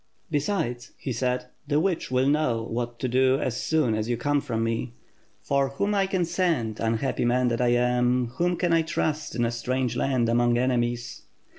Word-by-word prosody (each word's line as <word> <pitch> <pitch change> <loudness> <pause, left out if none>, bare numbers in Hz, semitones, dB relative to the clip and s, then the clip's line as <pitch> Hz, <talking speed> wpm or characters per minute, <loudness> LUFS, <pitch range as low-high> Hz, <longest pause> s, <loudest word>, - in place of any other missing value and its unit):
Be8.ides,' 140 -6 -1
he 130 - -4
said, 125 +1 -1 0.2
'the 145 0 +2
witch 175 0 -1
will 130 0 +2
know 140 -6 +1
what 120 +1 -4
to 130 - -2
do 130 +2 +3
as 125 -5 -1
soon 155 -8 +1
as 110 +1 -2
you 120 - 0
come 145 +4 +1
from 115 -3 -2
me; 115 +1 -2 0.5
for 140 -1 +1
whom 200 +10 -1 0.2
can 190 -1 -1
I - - +3
send, 165 - 0
unhappy 115 +4 0
man 125 +1 +2
that 115 +1 -1
I 125 - +3
am, 125 0 +2
whom 175 0 +1
can 175 -2 +1
I 165 - +4
trust 155 -2 -2
in 120 0 +1
a 115 - 0
strange 125 +1 -1
land, 125 -2 +1
among 120 +1 +3
enemies?' 120 -1 -1
125 Hz, 190 wpm, -26 LUFS, 120-145 Hz, 0.5 s, I